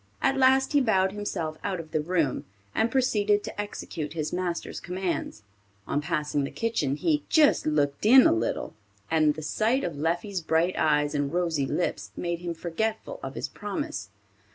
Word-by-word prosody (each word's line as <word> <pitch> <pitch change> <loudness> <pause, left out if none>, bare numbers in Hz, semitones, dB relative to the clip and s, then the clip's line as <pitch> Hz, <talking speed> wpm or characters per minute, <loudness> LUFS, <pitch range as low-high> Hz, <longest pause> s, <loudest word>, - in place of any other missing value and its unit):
At 270 0 +2
last 265 +1 +4
he 290 - +5
bowed 190 -6 +2
himself 175 -6 -4
out 190 -3 -2
of 160 -1 -9
the 155 -2 +1
room, 160 -4 0 0.3
and 225 - +2
proceeded 210 -5 +2
to - - -4
execute 165 -7 -6
his 155 -2 -3
master's 175 -1 -3
commands. 180 - -3 0.4
On 145 - -1
passing 150 -2 -1
the 140 - -2
kitchen, 225 -12 -1
he 300 - +1
"just 305 - +4
looked 145 -2 +1
in 260 +3 +9
a - - +6
little," 115 +1 -2 0.4
and 155 -2 +3
the 155 - -7
sight 220 - +1
of 170 - -3
Leffie's 175 +6 -1
bright 165 +3 +1
eyes 150 -1 +2
and 145 -1 -1
rosy 165 -5 0
lips 105 -4 -2
made 170 -1 -2
him 170 -1 -4
forgetful 220 - -3
of - - -6
his - - -3
promise. 290 +10 -5
175 Hz, 175 wpm, -27 LUFS, 155-215 Hz, 0.4 s, in